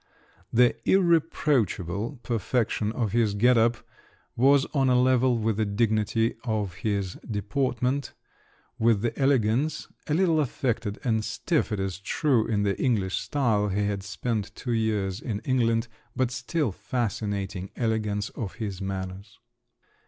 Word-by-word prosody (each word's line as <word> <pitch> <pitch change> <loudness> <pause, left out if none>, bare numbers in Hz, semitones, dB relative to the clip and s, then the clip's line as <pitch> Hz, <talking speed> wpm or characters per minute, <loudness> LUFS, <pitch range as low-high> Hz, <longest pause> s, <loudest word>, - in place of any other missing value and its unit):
The 120 +1 +4
irreproachable 140 - +1
perfection 110 -1 0
of 115 -5 -1
his 110 -3 +2
get 120 +5 +4
up 115 +1 +3 0.6
was 135 +3 +4
on 135 -3 +2
a 125 -1 +4
level 130 -1 +3
with 110 -2 0
the 110 - +1
dignity 110 +1 +1
of 105 -6 -1
his 100 -3 -2
deportment, 125 +4 -1 0.6
with 115 -3 +3
the 120 - -1
elegance—a 135 +3 0
little 170 -3 +3
affected 115 -6 -1
and 110 -3 +1
stiff, 115 +7 -1
it 105 - -1
is 95 -1 -3
true, 120 +2 +1
in 105 -3 +1
the 100 -1 -1
English 100 -8 +1
style 115 -8 +1
(he 100 +1 0
had 100 -1 -2
spent 105 +1 -3
two 120 - -3
years 105 -3 0
in 110 -5 -3
England)—but 120 0 -1
still 130 +1 -1
fascinating, 100 -4 -3
elegance 105 -3 -1
of 100 -5 -6
his 100 -4 -5
manners! 95 +1 -5
115 Hz, 130 wpm, -26 LUFS, 100-125 Hz, 0.6 s, The